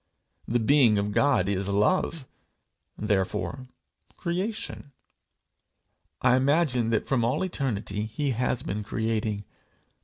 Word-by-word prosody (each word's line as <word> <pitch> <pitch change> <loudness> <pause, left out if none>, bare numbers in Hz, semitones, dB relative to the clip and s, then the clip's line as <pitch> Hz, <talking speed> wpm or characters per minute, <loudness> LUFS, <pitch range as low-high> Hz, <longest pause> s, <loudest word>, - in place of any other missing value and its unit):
The 120 - +2
being 120 -2 +4
of 100 +1 0
God 125 -5 +3
is 100 -1 -1
love, 130 - +1 0.7
therefore 105 +5 -1 0.5
creation. 180 -4 -3 1.3
I 125 -1 +5
imagine 130 -3 +2
that 115 -2 +1
from 130 -4 +1
all 120 +9 +1
eternity 110 - -2
he 135 +6 -2
has 125 0 -1
been 105 +2 -3
creating. 110 -1 -2
120 Hz, 110 wpm, -27 LUFS, 105-140 Hz, 1.3 s, I